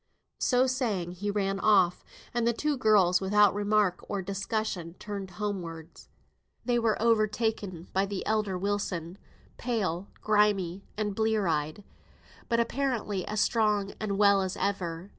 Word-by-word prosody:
So 250 0 +3
saying, 225 -9 -1
he 190 +3 -4
ran 195 -1 -1
off; 195 -4 +3 0.3
and 235 -1 +1
the 235 - +3
two 295 +5 0
girls, 200 -7 +4
without 205 +1 +4
remark 205 -2 +1
or 200 -2 -2
discussion, 195 -3 -3
turned 200 -1 -6
homewards. 175 -5 -6 0.6
They 245 -1 +2
were 225 -2 +1
overtaken 215 -5 0
by 195 +1 +1
the 195 -1 -4
elder 210 -3 0
Wilson, 190 -2 -3 0.4
pale, 200 -7 -1
grimy, 200 -3 +1
and 210 -1 -1
blear 220 -1 +1
eyed, 155 +3 -1 0.7
but 230 - +2
apparently 235 -6 -1
as 215 0 0
strong 210 -3 +1
and 200 -2 -2
well 200 -1 +5
as 190 -1 -3
ever. 185 -2 -2
205 Hz, 140 wpm, -28 LUFS, 185-215 Hz, 0.7 s, well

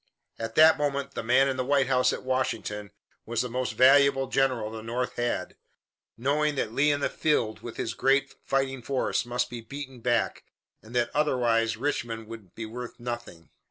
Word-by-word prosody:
At 115 0 -5
that 160 0 +7
moment 140 -1 -1
the - - -4
man 125 +4 +4
in 135 -1 -1
the 130 - 0
White 140 +1 +2
House 125 0 +3
at - - -5
Washington 115 -5 -2 0.3
was 120 +2 -1
the 125 - -4
most 130 +1 -2
valuable 135 +1 +5
general 125 -5 0
the 110 0 -7
North 120 +3 -3
had, 120 0 -2 0.6
knowing 145 +4 +1
that 115 -5 -2
Lee 145 +4 +3
in 145 0 -1
the - - +2
field 115 -8 0
with 120 - -9
his - - -2
great 135 0 +2
fighting 135 -1 -1
force 130 -1 -1
must 125 0 0
be 120 -1 -6
beaten 135 +2 -8
back, 120 -1 0 0.4
and 115 +3 -12
that 120 -1 +1
otherwise 120 -6 +2
Richmond 115 -4 -2
would 110 -6 -11
be 115 - -5
worth 120 +2 -8
nothing. 120 -9 -7
125 Hz, 185 wpm, -27 LUFS, 115-135 Hz, 0.6 s, that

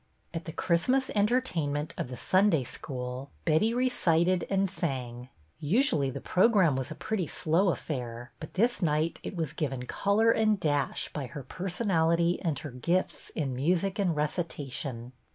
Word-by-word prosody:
At 165 0 -4
the 160 - -5
Christmas 250 +13 +1
entertainment 180 - 0
of - - -3
the 125 0 -7
Sunday 185 - +3
School, 125 +1 -5 0.2
Betty 185 +9 +3
recited 185 -8 +2
and 195 0 +2
sang. 130 -9 -4 0.3
Usually 175 - +2
the 135 +1 -5
program 185 - +3
was 130 +1 -2
a 155 - -6
pretty 195 -3 -2
slow 170 +7 +2
affair, 120 -7 -4
but 155 - -9
this 235 +3 +2
night 155 0 +1
it - - -6
was 160 -3 -2
given 135 -6 -3
color 210 - +2
and 215 -3 +2
dash 145 -5 -1
by 140 -4 -4
her 140 +3 -8
personality 170 - +1
and 165 -6 -1
her 145 - -7
gifts 170 +9 -1
in 140 -5 -1
music 180 +9 0
and 180 -5 +1
recitation. 145 -6 -3
165 Hz, 155 wpm, -29 LUFS, 140-195 Hz, 0.3 s, Sunday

